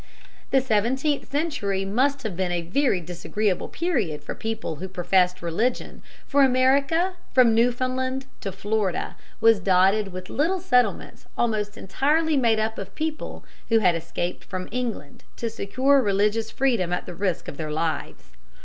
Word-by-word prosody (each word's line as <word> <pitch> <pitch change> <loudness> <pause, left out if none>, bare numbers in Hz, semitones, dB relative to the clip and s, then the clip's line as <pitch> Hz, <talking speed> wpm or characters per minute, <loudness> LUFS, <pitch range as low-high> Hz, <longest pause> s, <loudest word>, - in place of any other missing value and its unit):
] - - -29
The 270 - +4
seventeenth 260 +5 0
century 275 - -1
must 270 +7 +1
have 215 -5 -3
been 185 0 -1
a 175 -1 -1
very 200 - +1
disagreeable 180 +3 -2
period 195 - -2
for - - -5
people 220 -7 -4
who 190 - -5
professed 180 0 +1
religion, 220 +9 -2 0.2
for 285 0 +2
America 275 +7 +3 0.2
from 245 -3 +6
Newfoundland 255 +3 0
to 195 - -4
Florida 205 0 -2 0.3
was 225 -2 +6
dotted 195 +2 +3
with 185 -1 -8
little 345 +6 +1
settlements 250 -9 0
almost 215 -2 -1
entirely 300 - +1
made 235 -5 +3
up 220 +1 -1
of 195 -1 -8
people 315 0 -4 0.2
who 225 - +5
had 185 -5 +4
escaped 170 +1 -4
from 185 -1 -5
England 240 -12 -4
to 230 -1 -3
secure 260 +7 +2
religious 210 +1 +1
freedom 235 -11 +1
at 180 - -2
the - - -7
risk 185 0 -2
of 140 - -7
their 155 -2 -4
lives. 155 - -3
220 Hz, 155 wpm, -24 LUFS, 185-260 Hz, 0.3 s, from